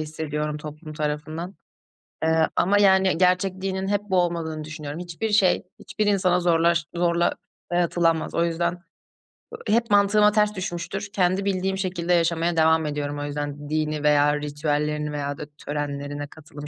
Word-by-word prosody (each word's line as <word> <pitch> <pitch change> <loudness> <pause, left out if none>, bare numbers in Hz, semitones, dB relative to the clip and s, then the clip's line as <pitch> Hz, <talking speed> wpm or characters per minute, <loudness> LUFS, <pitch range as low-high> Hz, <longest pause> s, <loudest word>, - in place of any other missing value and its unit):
hissediyorum 150 -1 -3
toplum 155 +1 -9
tarafından. 155 +4 -4 0.7
Eee, 160 0 +3
ama 200 +4 +3
yani 190 -3 +4
gerçek 185 +1 +2
dinin 190 0 -2
hep 205 0 +1
bu 190 -3 -1
olmadığını 165 -3 -2
düşünüyorum. 155 0 -7
Hiçbir 180 +5 -4
şey 205 -3 +3 0.2
hiçbir 215 - -3
insana 185 -3 +3
zorlaş 170 -2 +2
zorla 170 0 +2 0.4
dayatılamaz. 170 -2 +1
O 170 - +2
yüzden, 170 +1 0 0.7
ııı, 215 +1 -1
hep 235 0 -1
mantığıma 205 +1 +5
ters 210 0 +2
düşmüştür. 185 +1 -4
Kendi 185 +1 +1
bildiğim 190 0 0
şekilde 180 -2 -1
yaşamaya 170 0 +1
devam 160 0 +4
ediyorum 145 0 -3
o - - -3
yüzden 145 0 -5
dini 155 -1 -1
veya 145 0 +4
ritüellerini 150 0 -1
veya 145 -1 -3
da - - -6 0.2
törenlerine 145 0 -4
katılım 150 -1 -11
165 Hz, 150 wpm, -24 LUFS, 150-185 Hz, 0.7 s, mantığıma